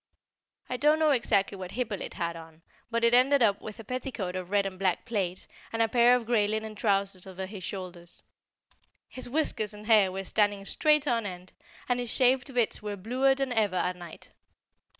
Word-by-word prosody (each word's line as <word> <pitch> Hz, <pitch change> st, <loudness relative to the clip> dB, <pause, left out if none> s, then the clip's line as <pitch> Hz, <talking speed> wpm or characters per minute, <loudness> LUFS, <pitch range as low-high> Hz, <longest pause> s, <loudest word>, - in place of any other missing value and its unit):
I 250 Hz, -, -3 dB
don't 300 Hz, +4 st, +4 dB
know 315 Hz, -1 st, +3 dB
exactly 200 Hz, -6 st, +1 dB
what 185 Hz, 0 st, -7 dB
Hippolyte 230 Hz, -5 st, -4 dB
had 170 Hz, -2 st, -3 dB
on, 165 Hz, 0 st, -13 dB, 0.3 s
but 230 Hz, 0 st, -1 dB
it 235 Hz, 0 st, +4 dB
ended 260 Hz, +2 st, +5 dB
up 200 Hz, -3 st, +2 dB
with 215 Hz, 0 st, -9 dB
a -, -, -7 dB
petticoat 240 Hz, -6 st, -4 dB
of 185 Hz, -1 st, -5 dB
red 200 Hz, 0 st, +2 dB
and 190 Hz, -1 st, -5 dB
black 185 Hz, -3 st, 0 dB
plaid, 195 Hz, -6 st, -3 dB, 0.3 s
and 225 Hz, -, -4 dB
a 225 Hz, -, +4 dB
pair 240 Hz, +2 st, +5 dB
of 245 Hz, -2 st, -2 dB
grey 220 Hz, -3 st, +2 dB
linen 220 Hz, +1 st, -3 dB
trousers 195 Hz, -3 st, -1 dB
over 190 Hz, 0 st, -6 dB
his 190 Hz, -1 st, -9 dB
shoulders; 180 Hz, -2 st, -7 dB, 0.8 s
his 255 Hz, -, -7 dB
whiskers 240 Hz, -7 st, 0 dB
and 210 Hz, +1 st, -11 dB
hair 210 Hz, -4 st, +5 dB
were 190 Hz, +1 st, -4 dB
standing 205 Hz, 0 st, 0 dB
straight 300 Hz, +5 st, +3 dB
on 230 Hz, -4 st, +1 dB
end, 180 Hz, -1 st, -9 dB, 0.3 s
and 245 Hz, -1 st, +1 dB
his 245 Hz, -1 st, -3 dB
shaved 260 Hz, +1 st, +3 dB
bits 240 Hz, -3 st, 0 dB
were 210 Hz, -1 st, -4 dB
bluer 255 Hz, +7 st, +2 dB
than 270 Hz, -1 st, -2 dB
ever 210 Hz, -5 st, +1 dB
at 180 Hz, 0 st, 0 dB
night. 175 Hz, -2 st, -12 dB
210 Hz, 195 wpm, -28 LUFS, 190-245 Hz, 0.8 s, ended